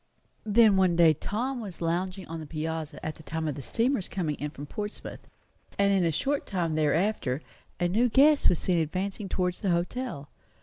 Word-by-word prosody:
Then 215 -1 +5
one 185 -2 +3
day 165 -2 +6
Tom 245 - -3
was 195 -6 -7
lounging 180 +3 -2
on 165 0 -5
the 155 - -8
piazza 160 -1 -4
at 155 - -2
the - - -15
time 160 +1 -3
of 150 - -1
the 140 - -7
steamer's 230 - 0
coming 170 -6 -2
in 150 - -3
from 145 0 -8
Portsmouth; 210 +7 -7 0.5
and 200 0 +3
in 190 -2 +3
a 165 - +2
short 280 - -1
time 175 -5 -1
thereafter 155 -2 +1 0.4
a 175 - +2
new 225 +7 +2
guest 285 +4 +5
was 175 - +2
seen 175 0 +1
advancing 190 +5 -2
towards 180 -1 -1
the 195 - -1
hotel. 175 - -2
180 Hz, 190 wpm, -28 LUFS, 160-205 Hz, 0.5 s, day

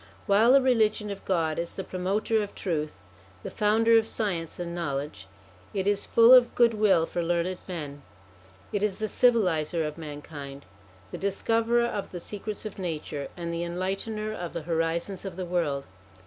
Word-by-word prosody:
While 220 +4 +5
the 275 -1 +6
Religion 215 -4 +2
of 200 - -7
God 165 -4 0
is 170 0 -4
the 190 - -4
promoter 195 +5 0
of 205 - -6
truth, 155 -5 -3 0.4
the - - -6
founder 225 +2 +4
of 220 - -3
science 180 -8 -2
and 170 -1 -4
knowledge, 140 - -4 0.5
it 190 -1 0
is 205 0 +1
full 230 +2 +7
of 250 -2 +6
goodwill 215 -8 +4
for 175 - -3
learned 175 +2 -1
men; 150 -6 -6 0.7
it 205 - 0
is 205 -2 0
the 215 - -2
civiliser 180 -10 +2
of 150 +2 -7
mankind, 145 -2 -8 0.5
the - - -6
discoverer 230 +4 +1
of 210 -4 -3
the 180 - -5
secrets 210 +4 -6
of 210 -2 -7
nature, 150 -5 -4
and 170 -1 -4
the 170 0 -2
enlightener 195 +5 -3
of 175 -5 -6
the 170 - -4
horizons 165 +3 -1
of 195 -3 -6
the 185 0 -4
world. 165 -6 -1
185 Hz, 170 wpm, -27 LUFS, 165-215 Hz, 0.7 s, full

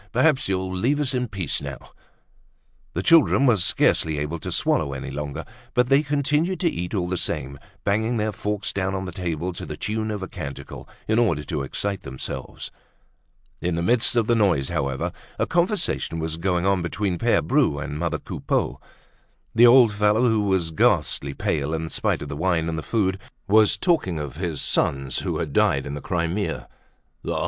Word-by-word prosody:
"Perhaps 135 -2 +3
you'll 95 -1 -1
leave 130 +10 +1
us 140 -3 0
in 125 -1 0
peace 95 -8 -3
now!" - - -5 1.2
The 90 - -1
children 155 -2 +5
were 120 -5 +5
scarcely 80 -3 +2
able 75 +3 -3
to - - -6
swallow 70 - +1
any 65 0 -5
longer, 75 +2 -5 0.3
but 125 0 +3
they 135 +1 +5
continued 150 +5 0
to 175 - +3
eat 90 +4 -4
all 90 -3 0
the 90 0 -1
same, 70 -5 -3 0.2
banging 110 +4 +1
their 110 0 0
forks 105 +1 -3
down 95 0 -1
on 95 0 -3
the 90 - -5
table 90 -1 -3
to - - -7
the - - -6
tune 110 +1 -2
of 105 -3 -3
a - - -4
canticle, 70 -5 -8 0.2
in 110 +2 +2
order 85 -11 +2
to 75 +1 -3
excite 100 +8 -2
themselves. 65 -2 -6 0.9
In 90 -1 0
the 85 - -1
midst 120 +4 +3
of 115 -2 +3
the 120 - +2
noise, 95 - +2
however, 70 -5 -1 0.3
a - - +1
conversation 175 - 0
was 80 0 -3
going 90 0 0
on 95 -1 +2
between 90 +1 -2
Pere 120 0 +2
Bru 135 - +2
and 75 0 -4
mother 85 -2 -1
Coupeau. - - -2 0.7
The 120 +2 +7
old 120 -3 +7
fellow, 105 +4 +3
who 110 -2 +2
was 95 -5 +1
ghastly 70 -2 +1
pale 75 +1 -1
in 80 0 -4
spite - - 0
of - - -7
the - - -5
wine 85 0 +1
and 80 - -2
the 80 - -3
food, 95 -1 0 0.3
was 105 +1 +5
talking 160 - +1
of 75 -1 -5
his 85 -5 -2
sons 70 -1 0
who - - -2
had 75 -4 -3
died 70 -1 +3
in 70 - -5
the 75 - -5
Crimea. 85 +5 -2 0.6
Ah! - - -1
95 Hz, 190 wpm, -24 LUFS, 80-110 Hz, 1.2 s, The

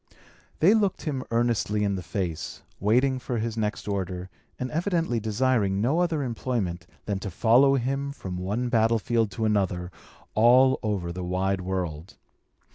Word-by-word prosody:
They 185 +7 +6
looked 205 -4 +1
him 140 -5 -2
earnestly 115 -3 +1
in 100 -1 +1
the 95 - -3
face, 85 -1 -4 0.2
waiting 130 +6 +2
for 125 -1 -3
his 115 0 -2
next 105 -2 -2
order, 95 -2 -3 0.3
and 125 0 -4
evidently 165 - 0
desiring 110 -2 +1
no 135 +10 +2
other 165 -4 +1
employment 115 -7 -3 0.2
than 100 -2 -2
to 100 - -5
follow 120 +9 +4
him 135 +2 -1
from 95 -10 -6
one 105 +7 -1
battlefield 115 0 +2
to 110 - -1
another, 95 -4 0 0.4
all 125 +4 +5
over 100 -6 -2
the 90 +1 -5
wide 95 +2 0
world. 90 -3 -4
110 Hz, 150 wpm, -26 LUFS, 95-130 Hz, 0.4 s, They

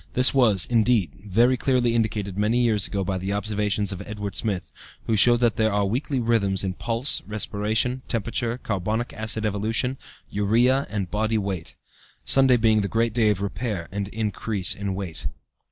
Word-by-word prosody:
This 125 +1 +6
was, 110 -9 +3
indeed, 115 - +2
very 115 +6 +3
clearly 125 -2 +1
indicated 105 -4 -1
many 110 +5 +1
years 110 -5 +1
ago 100 -1 -2
by 95 0 -2
the 95 +2 -3
observations 105 -1 -1
of 95 - -6
Edward 105 -2 -5
Smith, 100 -6 -2 0.3
who 115 - +1
showed 120 +3 +5
that 120 -2 +2
there 110 -1 +2
are 100 0 +1
weekly 130 +6 -1
rhythms 110 -5 +1
in 95 -1 -2
pulse, 115 +6 +1
respiration, 110 +4 -1
temperature, 120 +1 -2
carbonic 110 +2 -3
acid 110 0 -1
evolution, 110 +5 -1 0.3
urea, 120 +7 +2
and 100 -5 -4
body 110 +1 0
weight, 95 -5 -4 0.5
Sunday 135 -2 +5
being 110 -2 +3
the 100 - -1
great 115 +1 0
day 110 -2 +3
of 100 -2 0
repair 100 -3 -3
and 100 0 -3
increase 105 -2 -1
of 100 0 -6
weight. 95 -9 -4
110 Hz, 170 wpm, -24 LUFS, 100-120 Hz, 0.5 s, This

